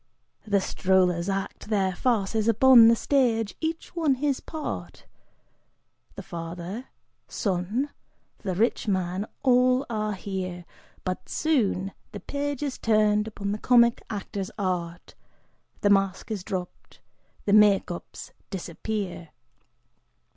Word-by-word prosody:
The 205 -1 +3
strollers 185 -1 +1
act 195 +2 -4
their 195 -3 +1
farces 220 -1 0
upon 230 +1 +8
the 230 - +6
stage, 230 -5 +1
each 325 +2 -4
one 315 -5 +2
his 280 0 0
part, 315 -2 -6 1.1
The - - -7
father, 175 +7 -6 0.4
son, 205 +9 -1 0.5
the 190 -4 -3
rich 225 +3 +1
man, 190 +1 -1 0.2
all 255 +1 +4
are 215 -1 -1
here, 185 -2 -5 0.4
But 185 -1 -4
soon 210 - +1 0.2
the - - -5
page 285 0 -3
is 280 -3 -3
turned 215 -1 +3
upon 200 -2 -4
the 210 - -3
comic 235 -1 +4
actor's 200 -2 -4
art, 175 -3 -3 0.7
The 205 - +3
masque 195 +1 +1
is 205 -4 -3
dropped, 180 -1 -6 0.5
the 200 - +2
make 205 -3 +5
ups 175 - -8 0.2
disappear! 185 -1 -4
205 Hz, 120 wpm, -26 LUFS, 185-240 Hz, 1.1 s, upon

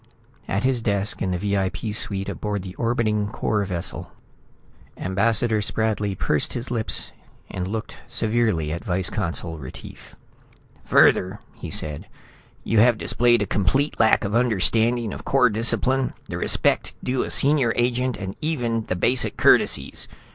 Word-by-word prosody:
At 100 +3 -1
his 130 -2 +1
desk 100 -1 -1
in 95 - 0
the 90 - -1
VIP 100 +2 -2
suite 100 -2 -1
aboard 105 -3 -3
the 95 -1 -8
orbiting 110 -3 0
Corps 105 -1 -1
vessel, 90 -3 -3 0.9
Ambassador 110 +3 +1
Spradley 105 -2 -1
pursed - - 0
his 120 +1 -5
lips 115 -3 0 0.4
and 90 -1 -4
looked 110 +3 -5
severely 110 -9 0
at 85 - -6
Vice 95 -2 0
Consul 85 -5 -2
Retief. 65 -3 -11 0.7
"Further," - - +3
he - - -8
said, 75 -2 -4 0.6
"you 110 0 +1
have 120 0 +5
displayed 120 -1 +2
a - - -2
complete 105 - 0
lack 110 -1 +4
of 100 0 -3
understanding 115 0 +2
of - - -8
Corps 125 -3 +3
discipline, 125 +4 +2
the - - -5
respect - - +1
due 125 0 0
a - - -3
senior 140 -4 +2
agent, 125 +1 0 0.2
even 120 -8 -1
the 90 - -1
basic 120 +8 0
courtesies. - - +3
110 Hz, 140 wpm, -23 LUFS, 95-120 Hz, 0.9 s, have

